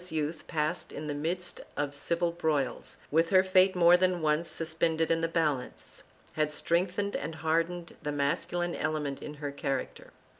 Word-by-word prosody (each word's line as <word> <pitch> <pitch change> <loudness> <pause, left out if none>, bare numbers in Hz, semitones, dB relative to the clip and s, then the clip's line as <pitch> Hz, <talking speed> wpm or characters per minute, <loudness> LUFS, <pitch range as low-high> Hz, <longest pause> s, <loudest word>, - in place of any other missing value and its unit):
I] - - -7
ISABELLA 180 -3 -3
23 150 -1 +1
bella's 160 - -6
youth, - - -19
passed 155 +1 -1
in 155 - -6
the 150 - -2
midst 175 +5 -3 0.2
of 145 -1 -1
civil 170 +4 0
broils, 150 -7 -1
with 165 +2 +3
her 185 -1 +6
fate 185 0 +4
more 175 0 +7
than 180 -2 +2
once 155 +2 +1
suspended 165 0 0
in 165 0 +2
the 165 - +1
balance, 155 -6 -2 0.3
had 155 -1 0
strengthened 180 +6 0
and 160 +3 -3
hardened 165 +2 -1
the 150 - -2
masculine 170 +4 -1
element 150 -3 -2
in 150 - -7
her 145 -1 -4
character. 140 -2 -3
165 Hz, 185 wpm, -30 LUFS, 150-175 Hz, 0.3 s, more